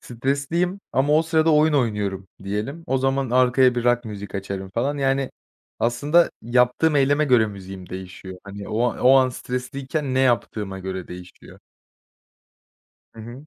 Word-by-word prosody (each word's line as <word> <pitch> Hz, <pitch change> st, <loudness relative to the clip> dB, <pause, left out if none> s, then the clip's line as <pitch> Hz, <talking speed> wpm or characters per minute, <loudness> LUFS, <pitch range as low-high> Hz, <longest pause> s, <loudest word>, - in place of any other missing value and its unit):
Stresliyim 140 Hz, -, -2 dB
ama 140 Hz, +3 st, +2 dB
o 160 Hz, -, +4 dB
sırada 160 Hz, 0 st, +2 dB
oyun 155 Hz, +1 st, +4 dB
oynuyorum 105 Hz, -7 st, -1 dB, 0.2 s
diyelim. 110 Hz, +12 st, -4 dB
O 135 Hz, -3 st, +1 dB
zaman 135 Hz, -1 st, 0 dB
arkaya 125 Hz, 0 st, +4 dB
bir 120 Hz, 0 st, -2 dB
rock 120 Hz, 0 st, +2 dB
müzik 105 Hz, -2 st, -8 dB
açarım 95 Hz, -1 st, -5 dB
falan 140 Hz, +5 st, -1 dB
yani 135 Hz, -1 st, 0 dB, 0.5 s
aslında 145 Hz, +9 st, +3 dB
yaptığım 125 Hz, +6 st, +2 dB
eyleme 145 Hz, +2 st, +3 dB
göre 125 Hz, -5 st, +4 dB
müziğim 95 Hz, -2 st, -9 dB
değişiyor. 95 Hz, 0 st, -9 dB
Hani, 100 Hz, 0 st, -8 dB
o 115 Hz, +3 st, -1 dB
an -, -, -9 dB
o 130 Hz, +1 st, +5 dB
an 130 Hz, -1 st, +4 dB
stresliyken 130 Hz, +3 st, -4 dB
ne 130 Hz, -, +2 dB
yaptığıma 105 Hz, -6 st, 0 dB
göre 95 Hz, -1 st, -6 dB
değişiyor. 90 Hz, 0 st, -12 dB, 1.5 s
Hı 110 Hz, -, -11 dB
hı. 120 Hz, +6 st, -10 dB
125 Hz, 150 wpm, -23 LUFS, 100-140 Hz, 1.5 s, o